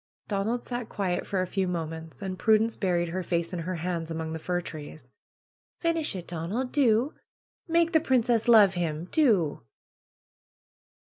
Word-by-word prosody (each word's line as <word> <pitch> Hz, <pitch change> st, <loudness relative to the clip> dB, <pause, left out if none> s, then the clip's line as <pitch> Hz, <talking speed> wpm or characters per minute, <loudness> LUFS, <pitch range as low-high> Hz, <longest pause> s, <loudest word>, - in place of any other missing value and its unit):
Donald 215 Hz, +4 st, -1 dB
sat 240 Hz, -2 st, -4 dB
quiet 185 Hz, -3 st, -2 dB
for 190 Hz, -2 st, 0 dB
a -, -, -1 dB
few 190 Hz, +1 st, -1 dB
minutes. 165 Hz, +1 st, -5 dB
And 185 Hz, -1 st, -4 dB
Prudence 220 Hz, +1 st, +3 dB
buried 175 Hz, -3 st, 0 dB
her 185 Hz, +3 st, -2 dB
face 170 Hz, -1 st, -2 dB
in 180 Hz, -, -2 dB
her 180 Hz, +3 st, -3 dB
hands, 170 Hz, -1 st, -3 dB
among 160 Hz, -1 st, -4 dB
the 160 Hz, -, -4 dB
fir 175 Hz, +2 st, -1 dB
trees. 155 Hz, -6 st, -9 dB, 0.7 s
^'Finish 330 Hz, -7 st, +1 dB
it, 180 Hz, -2 st, -6 dB
Donald! 180 Hz, +10 st, -3 dB
Do! 255 Hz, 0 st, +3 dB, 0.5 s
Make 335 Hz, 0 st, +3 dB
the 320 Hz, -, +6 dB
princess 245 Hz, -5 st, +2 dB
love 215 Hz, -5 st, +7 dB
him! 170 Hz, -1 st, -3 dB
Do!" 205 Hz, -, +2 dB
185 Hz, 155 wpm, -27 LUFS, 170-230 Hz, 0.7 s, love